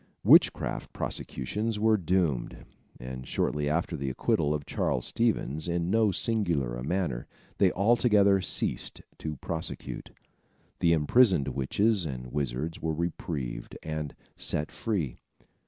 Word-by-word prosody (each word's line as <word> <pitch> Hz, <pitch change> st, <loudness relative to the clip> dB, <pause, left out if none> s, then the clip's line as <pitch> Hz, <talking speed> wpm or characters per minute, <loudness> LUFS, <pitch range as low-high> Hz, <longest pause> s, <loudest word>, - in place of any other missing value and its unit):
Witchcraft -, -, +4 dB
prosecutions 105 Hz, -, -3 dB
were 110 Hz, +1 st, +4 dB
doomed, 85 Hz, -, 0 dB, 0.3 s
and 65 Hz, 0 st, -7 dB
shortly 75 Hz, -1 st, 0 dB
after 85 Hz, +2 st, 0 dB
the 70 Hz, -3 st, -2 dB
acquittal 75 Hz, +2 st, +1 dB
of 75 Hz, -2 st, -2 dB
Charles -, -, -1 dB
Stevens 90 Hz, -, 0 dB
in 85 Hz, +1 st, 0 dB
so 110 Hz, -1 st, +4 dB
singular 85 Hz, -, 0 dB
a -, -, -5 dB
manner, 75 Hz, -6 st, -1 dB, 0.3 s
they 95 Hz, -3 st, +5 dB
altogether 100 Hz, -2 st, +4 dB
ceased -, -, -1 dB, 0.2 s
to 80 Hz, -1 st, -4 dB
prosecute. 80 Hz, +3 st, -5 dB, 0.7 s
The 85 Hz, -1 st, +4 dB
imprisoned 80 Hz, -, +4 dB
witches 95 Hz, -, +1 dB
and 65 Hz, -3 st, -6 dB
wizards 70 Hz, +3 st, -2 dB
were 80 Hz, -1 st, -1 dB
reprieved 75 Hz, -7 st, -4 dB
and 75 Hz, -2 st, -4 dB, 0.2 s
set 75 Hz, +1 st, -2 dB
free. 90 Hz, -, -2 dB
80 Hz, 120 wpm, -29 LUFS, 70-100 Hz, 0.7 s, they